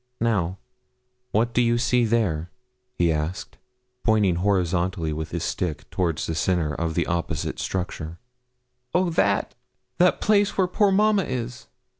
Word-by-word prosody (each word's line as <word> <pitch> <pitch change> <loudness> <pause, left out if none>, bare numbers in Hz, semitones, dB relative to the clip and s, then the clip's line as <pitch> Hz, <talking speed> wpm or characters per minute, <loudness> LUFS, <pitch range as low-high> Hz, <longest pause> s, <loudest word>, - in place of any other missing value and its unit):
'Now, 95 -6 0 0.7
what 115 +3 +1
do 125 - +3
you 120 0 +3
see 125 0 +2
there?' 95 -8 0 0.5
he 85 -1 +2
asked, 80 +4 -3 0.4
pointing 105 -6 +3
horizontally 90 -3 0
with 80 +1 -4
his 85 0 -3
stick 85 -4 -3
towards 85 -4 -1
the 80 - -2
centre 80 -2 0
of 80 +1 -2
the - - +1
opposite 85 -2 -2
structure. 85 -3 -4 0.8
'Oh, 180 -1 +2
that 100 -10 +1 0.5
that 180 +1 +4
place 205 -1 +2
where 190 - +4
poor 195 +2 +2
mamma 210 0 +3
is?' 125 -1 -5
95 Hz, 140 wpm, -24 LUFS, 85-120 Hz, 0.8 s, that